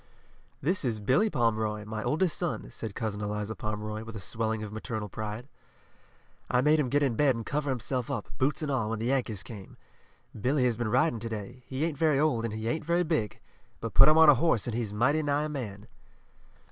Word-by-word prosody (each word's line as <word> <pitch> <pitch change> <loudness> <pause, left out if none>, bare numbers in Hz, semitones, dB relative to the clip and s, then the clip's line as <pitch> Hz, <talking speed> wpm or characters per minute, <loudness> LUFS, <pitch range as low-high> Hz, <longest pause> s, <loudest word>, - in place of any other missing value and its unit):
"This 180 +5 +1
is 115 -5 -1
Billy 130 - +3
Pomeroy, 110 - 0
my 110 0 -4
oldest 160 - +1
son," 175 -2 -3
said 110 -3 -6
Cousin 110 -3 -3
Eliza 105 +1 -2
Pomeroy, 105 0 -4
with 115 0 -9
a - - -4
swelling 110 +3 -2
of 105 -1 -7
maternal 110 -1 -4
pride. 110 +5 -5 1.0
"I 125 - +3
made 150 +3 +4
him 135 -4 +1
get 145 +3 +2
in 135 -4 +2
bed 135 +2 +3
and 115 -1 -5
cover 145 0 -1
himself 125 0 -2
up, 120 -7 -3
boots 140 +4 +1
and 145 - -1
all, 120 -5 0
when 115 - -1
the 110 - -3
Yankees 120 -6 0
came. 100 -5 -10 0.6
Billy 130 +5 +1
has 120 -2 +2
been 120 -1 -2
riding 125 +1 +2
to 115 +1 -5
day. 110 +3 -6
He 135 +4 -1
ain't 155 -4 -3
very 155 -4 +3
old, 140 -7 +2
and 110 - -3
he 110 +1 -4
ain't 155 +8 -1
very 170 +3 +2
big, 155 - -1 0.4
but 115 - -5
put 135 - +8
him 155 - +5
on 160 0 +8
a 150 - +10
horse 135 - +2
and 120 - -3
he's 115 -4 -2
mighty 130 +9 +2
nigh 145 0 +1
a 155 - -2
man." 110 -8 -6
120 Hz, 220 wpm, -29 LUFS, 110-145 Hz, 1.0 s, a